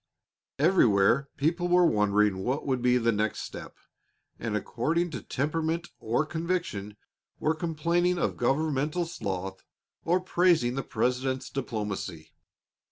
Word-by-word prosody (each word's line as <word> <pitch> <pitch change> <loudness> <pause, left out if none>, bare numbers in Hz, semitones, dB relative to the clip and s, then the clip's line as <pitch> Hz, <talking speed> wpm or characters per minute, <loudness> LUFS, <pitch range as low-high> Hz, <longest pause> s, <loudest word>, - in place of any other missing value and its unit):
Everywhere 140 - +4
people 170 +5 +1
were 180 0 +5
wondering 105 - +2
what 130 +9 -2
would 130 -3 0
be 125 0 +4
the 115 -1 +2
next 105 0 -1
step, - - -8 0.6
and, - - -1
according 170 +2 -1
to 140 - -5
temperament 160 +4 -2
or 120 +7 0
conviction, 160 - -3 0.4
were 155 - +2
complaining 170 +2 0
of - - 0
governmental 150 +5 0
sloth 95 - -4 0.4
or 175 +2 +2
praising 175 -8 +2
the 135 - -2
President's 130 +1 -1
diplomacy. 105 -10 -4
140 Hz, 120 wpm, -28 LUFS, 110-170 Hz, 0.6 s, were